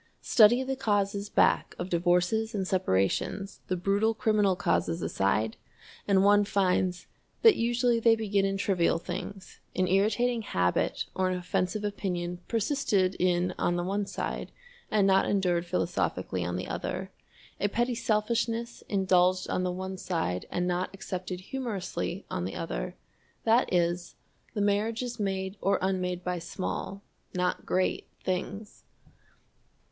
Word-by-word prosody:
Study 240 +3 +6
the 265 +1 -2
causes 205 -4 0
back - - +2
of 180 +1 -5
divorces 180 +6 +2
and 190 -2 -1
separations, 185 - 0
the 185 - 0
brutal 200 +5 +1
criminal 210 -4 +2
causes 170 -1 0
aside, 110 +3 0 0.5
and 195 -1 +4
one 205 +1 +6
finds 185 -2 +1 0.4
that 450 -2 +8
usually 240 0 +2
they 230 0 +5
begin 205 -3 0
in 195 0 0
trivial 185 -4 +2
things, 185 +3 -7 0.2
an 185 0 +2
irritating 220 +5 +2
habit 90 - 0
or 185 -1 +1
an 185 - -1
offensive 180 +3 -1
opinion 180 -4 -3
persisted 215 -6 +1
in 180 0 +2
on 175 - +1
the 175 - -1
one 200 +2 -1
side - - -4 0.4
and 210 -2 +3
not 190 0 +4
endured 180 -3 +1
philosophically 130 - -1
on 90 +1 -2
the 90 - -4
other; - - -4 0.5
a 205 - +1
petty 240 +4 0
selfishness 230 +1 -1
indulged 185 -2 +3
on - - 0
the 180 0 0
one 190 +1 -5
side 125 - -2
and 180 0 -1
not 180 +1 0
accepted 185 -1 -5
humorously 200 -5 -4
on 90 - -3
the 95 - -4
other, - - -4 0.5
that 230 +3 +3
is, 175 0 0 0.4
the 205 - 0
marriage 210 +4 +1
is 245 -1 -5
made 190 -1 -2
or 195 0 +2
unmade 180 -1 -1
by 180 -1 -2
small, 190 +3 -4 0.3
not 180 0 -1
great, 185 0 0 0.2
things. 200 +3 -4
190 Hz, 140 wpm, -29 LUFS, 180-210 Hz, 0.5 s, that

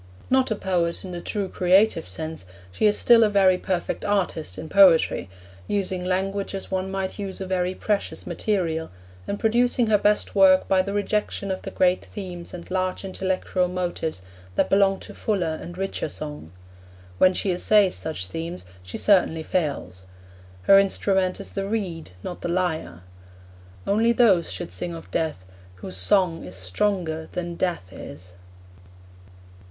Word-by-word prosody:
Not 260 0 +3
a 220 - 0
poet 175 -3 -1
in 185 - -7
the 175 -1 -5
true 205 0 -3
creative 185 -1 +3
sense, 160 - -6 0.2
she 210 - +2
is 210 - +3
still 235 -1 +6
a 215 - +3
very 190 -3 +4
perfect 180 -2 -2
artist 180 - -1
in 160 - -6
poetry, 175 - +5 0.4
using 190 -2 -1
language 195 +2 -1
as 195 - -6
one 190 0 -1
might 195 +1 -3
use 195 -2 -4
a 190 - -4
very 185 0 -1
precious 210 -2 -2
material, 165 -6 -1 0.4
and 200 - -3
producing 240 +2 +2
her 210 - +5
best 210 +1 +1
work 190 -2 +5
by 190 -1 +4
the 200 +2 -4
rejection 205 -1 -1
of 185 - -3
the - - -6
great 180 0 +2
themes 180 -4 -8
and 175 0 -9
large 185 +1 -1
intellectual 185 -1 -1
motives 175 - -3 0.3
that - - +1
belong 195 0 +4
to - - -9
fuller 175 -7 -1
and 175 +1 -9
richer 195 -4 -2
song. 150 - -6 0.7
When 185 0 +5
she 195 - 0
essays 195 +2 +3
such 155 -13 -4
themes, 165 - -6 0.2
she 90 +1 -7
certainly 175 -5 +3
fails. 140 - -2 0.6
Her 195 - +7
instrument 190 -1 +1
is 200 - -7
the 195 -1 -3
reed, 190 - -3
not 175 - -6
the - - -3
lyre. 160 - -2 0.8
Only 225 +3 +3
those 200 -8 +4
should 95 -2 -5
sing 90 -2 -4
of 85 +2 -11
Death 150 - -2 0.3
whose 95 0 -8
song 165 - +2
is 90 +1 -9
stronger 160 - -1
than 175 -1 -3
Death 170 - -2
is. 90 0 -10
185 Hz, 160 wpm, -24 LUFS, 160-195 Hz, 0.8 s, Her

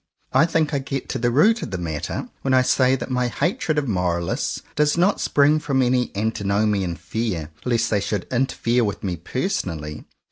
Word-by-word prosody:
I 160 - +5
think 160 -2 +1
I 140 - +1
get 135 0 -4
to 130 - -2
the 120 +1 +2
root 205 - +4
of - - -4
the 95 - -3
matter 80 -4 -4
when 130 -1 +2
I 130 - +5
say 130 0 +3
that 130 0 -5
my 125 -1 +1
hatred 170 - -1
of 145 -2 0
Moralists 90 -4 -1
does 150 +2 +2
not 185 +4 +2
spring 145 +2 +3
from 135 -3 +1
any 125 -1 +1
antinomian 100 -3 0
fear 85 -2 -3
lest 115 -2 +1
they 105 - +3
should 105 -2 -2
interfere 125 -1 +1
with 105 0 -3
me 90 -3 -1
personally. 85 - -3
120 Hz, 185 wpm, -22 LUFS, 100-140 Hz, -, I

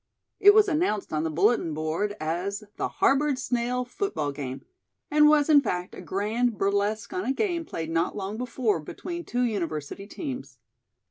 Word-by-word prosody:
It 410 0 +8
was 430 -1 +6
announced 305 - 0
on 155 - +1
the 160 - 0
bulletin 170 0 +2
board 160 +7 -1
as 180 +6 -2
the - - 0
"Harboard 280 0 +2
Snail 250 0 -1
Football 250 - -2
Game," 135 -2 -6 0.5
and 300 0 +6
was, 300 -1 +4
in 300 -3 +7
fact, 180 -7 -3
a - - -8
grand 220 +4 -1
burlesque 205 +2 0
on 185 - -2
a 250 - 0
game 340 +1 -1
played 165 - -5
not 165 +1 0
long 200 +1 -4
before 235 -4 0
between 345 - -6
two 245 -4 -1
university 190 -4 -3
teams. 270 - -6
215 Hz, 165 wpm, -26 LUFS, 180-275 Hz, 0.5 s, It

